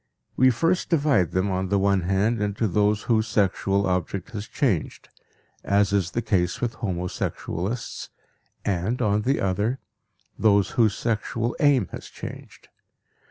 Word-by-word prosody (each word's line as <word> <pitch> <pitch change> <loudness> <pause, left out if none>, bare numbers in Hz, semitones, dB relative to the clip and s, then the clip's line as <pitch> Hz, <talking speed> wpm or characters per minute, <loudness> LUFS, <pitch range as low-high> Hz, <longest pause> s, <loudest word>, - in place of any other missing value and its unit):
We 130 +1 +5
first 165 +9 +1
divide 145 - +3
them, 95 +2 0
on 95 0 -1
the 100 - +2
one 100 -1 +2
hand, 100 +5 +1
into 105 +2 0
those 105 +2 +1
whose 110 -2 +1
sexual 100 -2 +1
object 90 +3 -2
has 105 -1 -6
changed, 115 - -1 0.5
as 100 0 +2
is 95 -4 +1
the 120 +5 -3
case 90 -5 0
with 120 -2 -1
homosexualists, 95 +2 -4 0.6
and, 100 +5 -1
on 105 -3 +2
the 135 +6 +1
other, 105 +6 0 0.6
those 100 -3 +3
whose 110 -4 +2
sexual 115 +1 -1
aim 140 - +4
has - - -8
changed. - - -10
105 Hz, 140 wpm, -24 LUFS, 95-115 Hz, 0.6 s, We